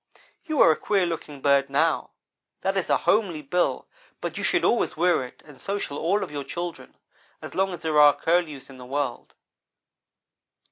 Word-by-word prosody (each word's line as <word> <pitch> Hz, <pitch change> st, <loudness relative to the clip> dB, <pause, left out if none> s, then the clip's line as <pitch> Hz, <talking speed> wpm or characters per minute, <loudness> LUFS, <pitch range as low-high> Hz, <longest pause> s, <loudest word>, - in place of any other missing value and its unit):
"'You 310 Hz, -3 st, -2 dB
are 165 Hz, -, +8 dB
a -, -, +2 dB
queer 195 Hz, +1 st, +1 dB
looking 155 Hz, -4 st, -5 dB
bird 140 Hz, -1 st, +3 dB
now. 155 Hz, +3 st, +1 dB, 0.5 s
That 195 Hz, +1 st, 0 dB
is 190 Hz, -, -1 dB
a -, -, +4 dB
homely 185 Hz, -8 st, +1 dB
bill, 175 Hz, +6 st, 0 dB, 0.3 s
but -, -, -5 dB
you -, -, -4 dB
shall -, -, +2 dB
always 235 Hz, -, +1 dB
wear 175 Hz, -4 st, +2 dB
it 125 Hz, -, -12 dB
and 145 Hz, -3 st, -14 dB
so 200 Hz, +1 st, -2 dB
shall 145 Hz, -7 st, -5 dB
all 195 Hz, +5 st, +1 dB
of -, -, -7 dB
your 145 Hz, -1 st, -4 dB
children, 175 Hz, +3 st, -7 dB, 0.4 s
as -, -, -9 dB
long 190 Hz, 0 st, +1 dB
as 175 Hz, -1 st, -8 dB
there 155 Hz, -2 st, +2 dB
are 145 Hz, -1 st, +7 dB
Curlews 165 Hz, -5 st, 0 dB
in 135 Hz, -2 st, -13 dB
the 125 Hz, -, -10 dB
world.' 140 Hz, -2 st, -3 dB
160 Hz, 190 wpm, -25 LUFS, 145-180 Hz, 0.5 s, are